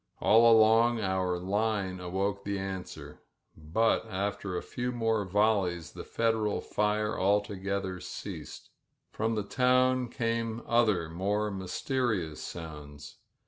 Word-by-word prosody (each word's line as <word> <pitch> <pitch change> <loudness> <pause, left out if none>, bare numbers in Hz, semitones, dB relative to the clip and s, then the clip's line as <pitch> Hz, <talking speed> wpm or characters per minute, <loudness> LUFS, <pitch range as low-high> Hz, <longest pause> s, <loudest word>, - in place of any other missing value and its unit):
All 115 +2 +6
along 115 +1 +5
our 95 -3 0
line 100 0 -1
awoke 95 +3 -2
the 100 0 -2
answer, 95 -1 -6 0.3
but 85 +9 +1
after 95 -1 -3
a - - -4
few 125 0 -3
more 115 -3 0
volleys 95 -3 +1
the - - -8
Federal 110 -2 0
fire 105 0 -1
altogether 100 -1 0
ceased. - - -8 0.4
From 110 +1 -1
the 105 - -1
town 130 +2 +2
came 115 -1 -2
other, 110 -8 +2
more 100 +5 -1
mysteri 100 - -1
ous 75 - -10
sounds. 75 -3 -9
105 Hz, 120 wpm, -29 LUFS, 95-115 Hz, 0.4 s, All